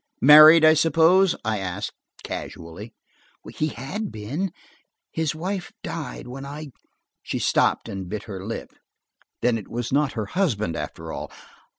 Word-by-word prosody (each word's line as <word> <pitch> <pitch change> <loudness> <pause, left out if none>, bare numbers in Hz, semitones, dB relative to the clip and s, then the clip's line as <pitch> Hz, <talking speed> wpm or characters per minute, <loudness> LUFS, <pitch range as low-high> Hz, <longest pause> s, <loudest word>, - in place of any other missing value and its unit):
"Married, 155 +2 +9
I 155 - +8
suppose?" 165 +4 +4
I 110 -1 0
asked 90 -2 -4 0.3
casually. 85 +8 -8 0.6
"He 155 - 0
had 155 - -5
been. 140 - -4 0.6
His 160 -2 -1
wife 185 +3 -4
died 160 -7 -6
when 135 +2 -8
I–" 145 +1 -8 0.5
She - - -4
stopped - - +1
and 95 -2 -6
bit 105 +1 -4
her 95 -3 -7
lip. 115 +3 -6 0.7
Then 120 -2 +2
it 105 - -11
was 120 0 -4
not 145 0 +1
her 110 -4 -3
husband, 110 - -1
after - - -6
all! - - -6
140 Hz, 145 wpm, -24 LUFS, 110-160 Hz, 0.7 s, Married